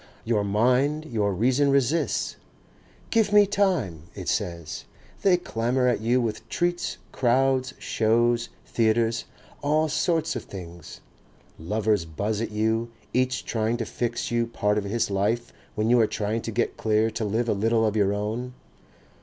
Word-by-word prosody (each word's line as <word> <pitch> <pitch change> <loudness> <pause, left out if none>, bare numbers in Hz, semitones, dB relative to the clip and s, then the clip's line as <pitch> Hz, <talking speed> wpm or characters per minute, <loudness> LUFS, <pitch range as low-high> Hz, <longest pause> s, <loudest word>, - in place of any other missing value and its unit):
Your 110 -3 +1
mind, 125 +9 +2
your 105 -8 0
reason 130 +9 +2
resists. 140 +4 +1 0.8
"Give 225 -2 +3
me 205 0 +7
time," 180 - 0
it - - -7
says. 85 -2 -3 0.4
"They 185 -2 +4
clamour 125 -5 0
at 120 -4 +1
you 120 +3 +2
with 115 -1 -3
treats, 175 +7 -1
crowds, 130 +1 +1
shows, 120 +2 +1 0.2
theatres, 115 0 +1 0.4
all 155 +2 +2
sorts 165 +1 0
of - - -5
things; 85 -4 -10 0.6
lovers 105 +1 0
buzz 100 +7 -2
at 115 - -2
you, 110 +2 0 0.2
each 130 +1 0
trying 115 +1 0
to 115 - -3
fix 120 +2 -3
you 120 0 +1
part 105 -2 0
of 100 - -5
his 115 +1 -1
life 110 +5 0 0.2
when 110 +2 +1
you 125 - +6
are 110 - +4
trying 110 +2 -2
to 115 - -5
get 120 +2 -1
clear 110 0 +2
to 110 - -3
live 110 +3 0
a - - +2
little 110 +2 +2
of 110 -1 0
your 100 -2 +3
own." 110 +5 -3
115 Hz, 155 wpm, -25 LUFS, 105-130 Hz, 0.8 s, me